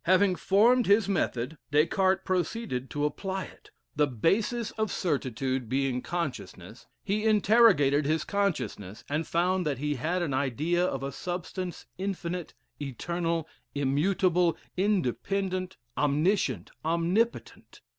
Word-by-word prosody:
Having 185 +1 +4
formed 235 +5 +4
his 200 0 +4
method, 155 -6 -1
Des 150 +2 +4
Cartes 190 +2 +1
proceeded 180 - -2
to 145 0 -1
apply 190 +5 -3
it. - - -14 0.3
The 150 0 +3
basis 210 - 0
of 220 -1 -2
certitude 130 - -1
being 130 -1 0
consciousness, 170 -6 -5 0.2
he 210 +2 -1
interrogated 200 -10 +5
his 155 +1 +1
consciousness, 160 - -2
and 150 +3 -2
found 180 +2 +1
that 140 -3 -1
he 150 +3 -1
had 165 +7 -1
an 145 -6 -2
idea 145 +7 +1
of 135 -7 -1
a 140 - -3
substance 180 +4 -5
infinite, 180 -3 -4 0.3
eternal, 165 +4 -2 0.3
immutable, 170 +5 +2 0.2
independent, 185 - -1 0.2
omniscient, 150 - +1
omnipotent. 170 +8 -1
170 Hz, 120 wpm, -28 LUFS, 140-195 Hz, 0.3 s, interrogated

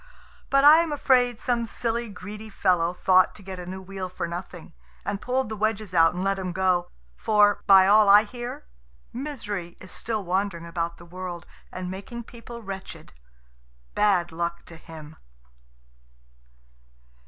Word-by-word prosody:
But 275 0 +4
I 300 +2 +9
am 335 -2 0
afraid 250 -5 +2
some 240 -2 0
silly, 235 0 -3
greedy 210 +3 -9
fellow 180 -4 +1
thought 185 +1 +3
to 205 - -13
get 190 -1 -7
a 175 - -8
new 190 +1 -7
wheel 190 -1 -6
for 180 - -4
nothing, 175 +2 -8 0.3
and 200 - -3
pulled 260 0 -1
the 220 - -5
wedges 215 -2 -2
out 165 0 +4
and 180 - -3
let 195 0 0
him 185 -2 -4
go; 180 -1 +1 0.3
for, 205 - +3
by 195 -1 +8
all 210 +1 +6
I 205 +1 +8
hear, 240 - -7 0.5
Misery 210 - -5
is 190 - -12
still 220 -2 -3
wandering 185 -1 -2
about 170 0 -3
the 170 - -14
world 175 0 -7 0.3
and 185 0 -5
making 200 +5 -7
people 235 0 -11
wretched 195 - -8 0.8
bad 185 -5 +2
luck 170 +1 -4
to 170 - -12
him! 160 -1 -12
195 Hz, 155 wpm, -25 LUFS, 180-220 Hz, 0.8 s, I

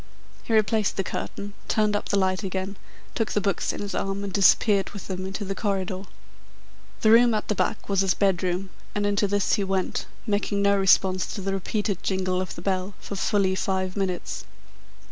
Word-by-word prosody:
He - - -7
replaced 215 -1 +2
the 195 - +1
curtain, 200 +1 -5
turned 210 -1 +2
up 205 - -2
the 200 - +2
light 185 0 +1
again, 190 0 -3 0.4
took 225 - -1
the - - +2
books 200 -1 0
in - - -6
his 205 -1 -4
arms 195 +1 -2
and 195 -2 -5
disappeared 200 0 +4
with 200 - -9
them 185 0 -4
into 195 +2 -4
the 195 - -2
corridor. 195 -1 -2 1.0
The 215 - +5
room 235 0 +6
at 210 - -3
the - - +3
back - - -1
was 195 -1 +2
his 190 -2 +2
bedroom, 185 -1 0 0.2
and 205 0 0
into 205 0 +2
this 205 -1 +1
he 205 - +2
went, 190 -1 -1 0.2
making 205 -2 0
no 200 0 +4
response 190 -1 +3
to 200 - -4
the 195 +1 -2
repeated 200 0 -2
jingle 185 -1 0
of 185 - -5
the 170 - -9
bell 190 0 -1
for 200 - -6
fully 195 -1 +2
five 190 -1 -1
minutes. 190 -3 -2
195 Hz, 195 wpm, -25 LUFS, 190-205 Hz, 1.0 s, room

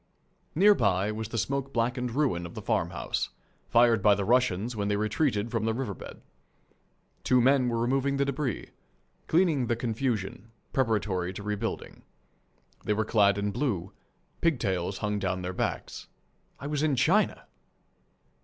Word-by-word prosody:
Near 205 +6 +7
by 100 - +1
was 110 0 -5
the 115 - -4
smoke 135 +3 -1
blackened 125 0 -1
ruin 105 - 0
of 85 - -13
the - - -5
farmhouse, - - -1 0.4
fired 115 -2 +5
by 105 0 +5
the 100 -1 -2
Russians 120 -2 +2
when 100 -1 -1
they 105 - +1
retreated 110 +1 0
from 115 -2 -1
the 110 0 0
riverbed. 115 -7 -6 1.0
Two 125 - +4
men 130 0 +4
were 115 - -1
removing 135 +4 +1
the 140 - +2
debris, 140 -4 -3 0.6
cleaning 160 -7 +2
the 120 - +1
confusion, 115 -3 -2 0.2
preparatory 105 -8 0
to 100 - -7
rebuilding. 105 0 -4 0.8
They 105 - +1
were 110 +1 0
clad 100 -2 +3
in 100 0 -1
blue. 100 - -2 0.5
Pigtails 95 - 0
hung 105 -1 -1
down 95 -1 -2
their 90 +1 -3
backs. - - -3 0.5
I - - -8
was 145 0 -1
in 150 -3 +2
China! 180 - +2
115 Hz, 150 wpm, -28 LUFS, 100-135 Hz, 1.0 s, Near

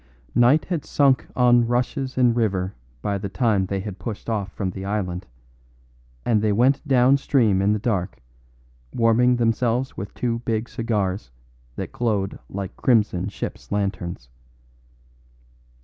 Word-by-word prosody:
Night 130 +6 +4
had 170 -5 -2
sunk 140 -3 +2
on 120 -1 +4
rushes 130 +2 -1
and 125 -2 +4
river 100 -5 0 0.3
by 100 -1 -1
the 100 0 -4
time 100 -2 +1
they 95 0 -2
had 100 -1 -7
pushed 105 +3 -5
off 100 -4 -2
from 95 -3 -3
the 95 +1 -7
island, 95 -3 -3 1.0
and 110 -3 +2
they 105 -1 +2
went 130 +7 +3
down 130 0 +5
stream 115 -9 +2
in 100 +2 +3
the 105 - +2
dark, 100 -4 -2 0.7
warming 120 +2 +3
themselves 120 +2 0
with 100 +1 -5
two 115 -2 -1
big 115 -1 -2
cigars 105 - -2 0.5
that - - -5
glowed 105 -5 -1
like 100 0 -5
crimson 105 -7 +2
ships' - - -7
lanterns. 95 -9 -3
110 Hz, 140 wpm, -23 LUFS, 100-120 Hz, 1.0 s, down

